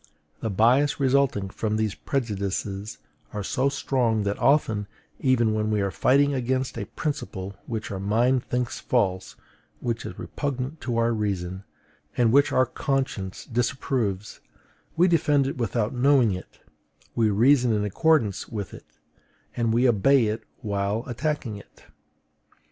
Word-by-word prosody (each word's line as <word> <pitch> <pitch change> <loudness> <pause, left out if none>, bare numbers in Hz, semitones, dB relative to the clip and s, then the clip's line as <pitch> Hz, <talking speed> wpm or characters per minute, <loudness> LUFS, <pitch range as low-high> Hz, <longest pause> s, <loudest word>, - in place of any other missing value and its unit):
The 110 - -2
bias 125 +9 +3
resulting 130 -8 +2
from 110 0 -2
these 110 -2 0
prejudices 100 -4 -3 0.4
is 105 -2 -3
so 135 +2 +1
strong 120 -6 0
that 100 0 -2
often, 110 -8 +2 0.3
even 120 -5 +2
when 110 0 0
we 105 -1 +1
are 100 -1 0
fighting 140 +6 +3
against 130 0 -1
a 110 -3 -4
principle 120 -11 -4
which 110 -3 -4
our 95 - -4
mind 120 +6 +2
thinks 125 -1 -2
false, 95 -7 0 0.4
which 115 -1 -2
is - - -7
repugnant 140 +1 -4
to 120 -2 -2
our 115 0 +2
reason, 95 -3 -3 0.5
and 120 -2 +4
which 140 +3 +4
our 130 - +4
conscience 130 -8 -3
disapproves, 115 -4 -2 0.6
we 175 +2 +5
defend 150 -5 +3
it 135 - -3
without 115 -1 -1
knowing 130 -2 +4
it, 90 0 -8 0.5
we 115 -2 +2
reason 120 +4 +4
in 105 -1 +1
accordance 115 - +1
with 105 -4 -5
it, - - -14 0.6
and 115 -2 +1
we 120 +3 +3
obey 125 +3 +4
it 110 +1 -2 0.2
while 100 +1 -1
attacking 130 -3 -3
it. 100 - -16
115 Hz, 145 wpm, -25 LUFS, 105-130 Hz, 0.6 s, we